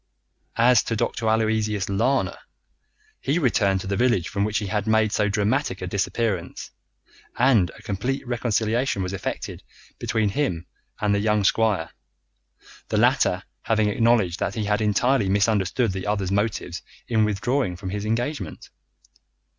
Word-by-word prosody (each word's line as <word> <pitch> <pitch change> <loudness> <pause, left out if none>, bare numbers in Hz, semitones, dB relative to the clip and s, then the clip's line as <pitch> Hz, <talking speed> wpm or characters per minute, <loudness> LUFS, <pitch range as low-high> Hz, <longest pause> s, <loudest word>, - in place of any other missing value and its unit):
As 120 +2 +5
to 115 - -1
Dr. 110 +1 -1
Aloysius 110 -2 +1
Lana, 120 +7 +1 0.8
he 145 - 0
returned 100 - +2
to - - -8
the 100 - -1
village 120 -7 +1
from 100 - -1
which 105 0 0
he 105 - -2
had 105 +2 -2
made 110 -1 +3
so 105 0 +1
dramatic 105 +1 0
a - - -4
disappearance, 100 0 -2 0.7
and 115 -8 +4
a - - -16
complete 130 +8 -3
reconciliation 120 -2 0
was 90 +1 -4
effected 95 - -5 0.4
between 110 -2 0
him 95 - -1 0.3
and 105 -1 +1
the 100 - +2
young 105 0 +1
squire, 100 -6 +1 1.0
the - - -1
latter - - +3 0.2
having 110 -2 +1
acknowledged 105 -5 +2
that 100 - -2
he 110 - -2
had 105 +1 +1
entirely 110 +1 +2
misunderstood 100 +3 +1
the 95 +1 -5
other's 100 -3 -1
motives 105 +2 -1 0.3
in 110 -2 +2
withdrawing 105 0 0
from 95 +1 -6
his 105 0 -3
engagement. 115 - -3
105 Hz, 145 wpm, -24 LUFS, 100-115 Hz, 1.0 s, As